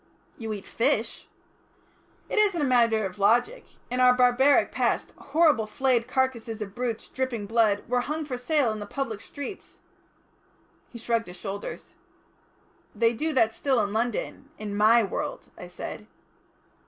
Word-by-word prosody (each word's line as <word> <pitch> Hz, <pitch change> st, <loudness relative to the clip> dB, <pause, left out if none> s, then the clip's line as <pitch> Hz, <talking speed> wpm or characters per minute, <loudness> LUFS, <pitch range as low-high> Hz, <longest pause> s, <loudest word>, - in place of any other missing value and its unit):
"You 225 Hz, -2 st, -4 dB
eat 205 Hz, -2 st, -6 dB
fish." 235 Hz, -2 st, -1 dB, 1.0 s
"It -, -, 0 dB
isn't 405 Hz, -5 st, +3 dB
a -, -, +1 dB
matter 230 Hz, -4 st, +3 dB
of 190 Hz, +2 st, -7 dB
logic. 245 Hz, -, +2 dB, 0.3 s
In 250 Hz, -, -1 dB
our 250 Hz, 0 st, +6 dB
barbaric 250 Hz, +3 st, +4 dB
past -, -, -1 dB
horrible 295 Hz, -7 st, +2 dB
flayed 240 Hz, +1 st, +1 dB
carcases 245 Hz, -4 st, -1 dB
of 200 Hz, -2 st, -6 dB
brutes 240 Hz, -1 st, -3 dB
dripping 260 Hz, -5 st, -3 dB
blood, 215 Hz, -2 st, +1 dB
were 250 Hz, +1 st, +1 dB
hung 305 Hz, +4 st, -3 dB
for 265 Hz, -3 st, -4 dB
sale 250 Hz, -1 st, +1 dB
in 215 Hz, -, -5 dB
the 205 Hz, -, -7 dB
public 225 Hz, -4 st, -4 dB
streets." 285 Hz, -, -9 dB, 1.1 s
He 240 Hz, -, -10 dB
shrugged 230 Hz, -2 st, -1 dB
his 180 Hz, 0 st, -10 dB
shoulders. 200 Hz, +1 st, -7 dB, 1.0 s
"They 230 Hz, 0 st, +3 dB
do 310 Hz, +8 st, -1 dB
that 225 Hz, -4 st, +3 dB
still 280 Hz, -8 st, +1 dB
in 205 Hz, 0 st, -3 dB
London 240 Hz, +4 st, -2 dB
in 210 Hz, -1 st, -5 dB
my 220 Hz, +3 st, +5 dB
world," 195 Hz, -, -5 dB
I -, -, -9 dB
said. -, -, -8 dB
235 Hz, 155 wpm, -26 LUFS, 220-265 Hz, 1.1 s, our